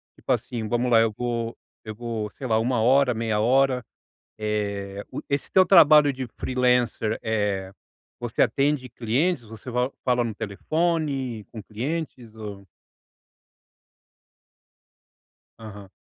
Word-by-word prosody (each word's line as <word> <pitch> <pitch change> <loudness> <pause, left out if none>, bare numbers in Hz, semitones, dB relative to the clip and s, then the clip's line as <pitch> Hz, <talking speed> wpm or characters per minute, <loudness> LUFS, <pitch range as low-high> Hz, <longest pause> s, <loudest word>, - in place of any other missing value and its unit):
Tipo - - -4
assim, 115 -3 -2
vamos 120 +1 0
lá, 115 - +7
eu 115 -1 +3
vou 120 -1 -3 0.3
eu 110 -1 -6
vou, 115 -2 -4
sei 130 - -7
lá, 110 -1 +2
1 120 0 +1
hora, 130 +1 +4
meia 110 -2 -1
hora. 130 +1 +2 0.5
Eh, 100 -2 -3
o - - -5
esse 140 0 -2
teu 190 -1 +6
trabalho 150 -5 +7
de 130 -1 -5
freelancer, 125 -3 +1
eh, 105 -4 -1 0.5
você 120 -1 0
atende 140 -2 +1
clientes, 125 +7 0
você 110 +3 -10
fala 125 +2 0
fala 125 -1 +2
no 110 -3 -3
telefone, 135 - -2
com 110 -3 -7
clientes, 125 - -5
ou 100 -3 -8 2.9
Aham. 100 -3 -10
120 Hz, 125 wpm, -25 LUFS, 110-130 Hz, 2.9 s, lá